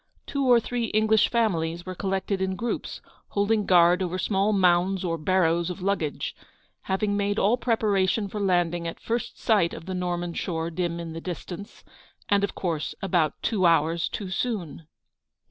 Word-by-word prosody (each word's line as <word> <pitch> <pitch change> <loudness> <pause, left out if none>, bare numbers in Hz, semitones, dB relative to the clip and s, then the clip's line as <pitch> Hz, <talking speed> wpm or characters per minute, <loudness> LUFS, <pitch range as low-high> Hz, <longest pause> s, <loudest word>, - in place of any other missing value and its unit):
Two 280 -2 -1
or 240 - +7
three 240 +1 -2
English 215 0 +3
families 170 -8 0
were 185 - -5
collected 190 +1 -2
in 190 0 0
groups, 235 +4 -4 0.3
holding 205 0 +1
guard 175 0 +5
over 185 0 -2
small 195 +2 +1
mounds 185 -1 +3
or 165 -1 0
barrows 170 0 +1
of 180 - -5
luggage, 185 -7 -1 0.5
having 205 +2 +1
made 205 0 0
all 215 +4 +3
preparation 215 -4 +1
for 210 +2 -5
landing 175 -3 +1
at 165 - -6
first 230 0 -3
sight 205 -7 +2
of 165 - -9
the 190 - -4
Norman 175 -1 -2
shore 165 -2 -3
dim 170 0 -2
in 165 -1 -6
the 165 - -6
distance; 185 +4 -7 0.5
and 200 -1 +3
of 200 - -1
course 165 -5 -2
about 170 -6 +1
two 190 -6 +2
hours 165 0 +2
too 195 -3 -5
soon. 190 -8 -3
185 Hz, 165 wpm, -26 LUFS, 170-205 Hz, 0.5 s, or